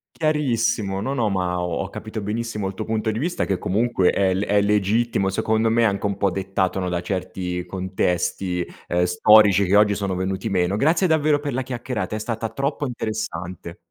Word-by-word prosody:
Chiarissimo, 115 -10 0
no, 130 +6 -2
no 115 -5 +1
ma 90 -2 -1
ho 90 -2 -2
ho 95 - -7
capito 110 +1 -6
benissimo 105 0 -3
il 95 - -4
tuo - - -4
punto 110 0 -1
di 110 - -4
vista, 170 +8 -1
che 95 - 0
comunque 105 0 +1
è 95 -1 +2
le 95 +3 -1
è 105 0 +3
legittimo 105 0 +1
secondo 110 +3 +1
me, 115 0 +3
anche 100 -1 0
un 100 -1 -1
po' 100 - +2
dettato, 95 0 -1
no, 90 -1 -2
da 90 -1 -1
certi 90 -1 -4
contesti, 90 -1 -1 0.2
ehm, 90 0 +1
storici 100 +2 +5
che 95 +2 +2
oggi 105 0 +5
sono 100 -2 -2
venuti 95 +1 -2
meno. 90 0 +1
Grazie 160 - +2
davvero 155 -2 +2
per 145 -2 -4
la 130 +2 -1
chiacchierata. 120 -5 -4
È - - -3
stata 115 0 -3
troppo 140 +5 -2
interessante. 100 - -5
105 Hz, 195 wpm, -22 LUFS, 95-115 Hz, 0.2 s, storici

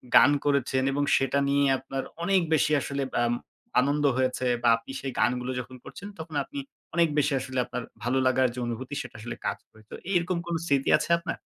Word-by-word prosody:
গান 145 - +8
করেছেন 135 -2 +2
এবং 145 +1 0
সেটা 135 +1 +1
নিয়ে 140 0 +3
আপনার 135 0 -5 0.2
অনেক 190 +1 +3
বেশি 155 - +3
আসলে 140 0 -2 0.2
আম 120 - +1 0.5
আনন্দ 145 +3 +1
হয়েছে 130 0 0 0.2
বা 120 - +5
আপনি 115 +3 -11
সেই 135 - -3
গানগুলো 125 +2 +1
যখন 125 +1 -8
করছেন, 200 - -9
তখন 160 -1 -7
আপনি 285 - -7 0.4
অনেক 170 -1 +5
বেশি 150 0 +2
আসলে 130 0 -6
আপনার 125 0 -5 0.2
ভালো 125 +3 +1
লাগার 130 0 +3
যে - - -4
অনুভূতি, 120 +4 -5
সেটা 120 -2 -10
আসলে 120 +2 -6
কাজ - - -1
করে। 110 - -19
তো - - -5 0.2
এরকম 180 0 +1
কোনো 170 -1 -1
স্মৃতি 140 -4 +1
আছে - - -4
আপনার? 170 +2 -4
135 Hz, 200 wpm, -27 LUFS, 125-150 Hz, 0.5 s, গান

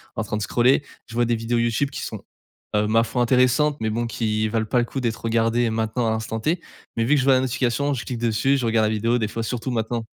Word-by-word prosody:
en 110 - -1
train 105 - -4
de - - -4
scroller, 125 +7 +3 0.2
je 115 - -12
vois 120 0 +2
des 120 0 +1
vidéos 115 +1 -1
YouTube 120 +4 0
qui - - -6
sont, - - -6 0.5
heu, 105 0 +2
ma 115 +1 +3
foi 120 +2 -2
intéressantes 130 +4 +3
mais 110 -1 0
bon 120 +1 -1
qui 110 -1 -1
valent 110 0 0
pas 120 +3 +1
le 120 - +1
coup 135 +2 -5
d'être 115 -2 -2
regardé 115 +1 +1
maintenant 110 +1 -1
à - - +2
l'instant 110 0 -3
T, 165 +9 0 0.4
mais 115 - +2
vu 145 - +3
que - - +3
je - - +1
vois 135 - +6
la 130 - +3
notification, 130 +2 0
je 120 - -4
clique 125 - -4
dessus, 120 +4 +2
je 125 - -2
regarde 110 -1 +2
la 110 - 0
vidéo 115 +3 +1
des 110 - 0
fois, 115 +1 -4
surtout 125 +3 -3
maintenant. 115 0 -2
115 Hz, 270 wpm, -23 LUFS, 110-125 Hz, 0.5 s, vois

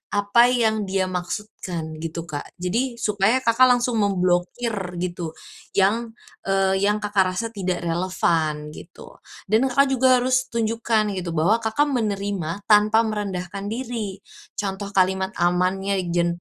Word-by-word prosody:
apa 205 +4 +4
yang 220 -3 +1
dia 190 -1 +1
maksudkan 180 -3 -5
gitu, 165 0 -4
Kak. 145 -3 -7
Jadi, 235 +8 -1
supaya 210 +3 +2
Kakak 235 +3 +5
langsung 240 -2 0
memblokir 185 +4 0 0.3
gitu 175 -2 -4 0.5
yang, 225 +4 +2 0.3
eee, 195 0 +2
yang 210 +1 +2
Kakak 190 -3 +1
rasa 230 +4 -1
tidak 185 -3 -2
relevan 165 -3 0
gitu 170 - -13 0.3
dan 220 +6 +3
Kakak 275 +2 +3
juga 255 0 +4
harus 255 0 +1
tunjukkan 225 -2 0
gitu 170 -2 -4
bahwa, 200 +9 +3
Kakak 230 +7 +1
menerima 200 -5 -2
tanpa 215 +2 +5
merendahkan 200 -3 -4
diri. 225 -5 -4 0.4
Contoh 200 0 -3
kalimat 190 +1 +2
amannya 185 +3 +1
jen 175 0 +2
200 Hz, 130 wpm, -23 LUFS, 180-225 Hz, 0.5 s, Kakak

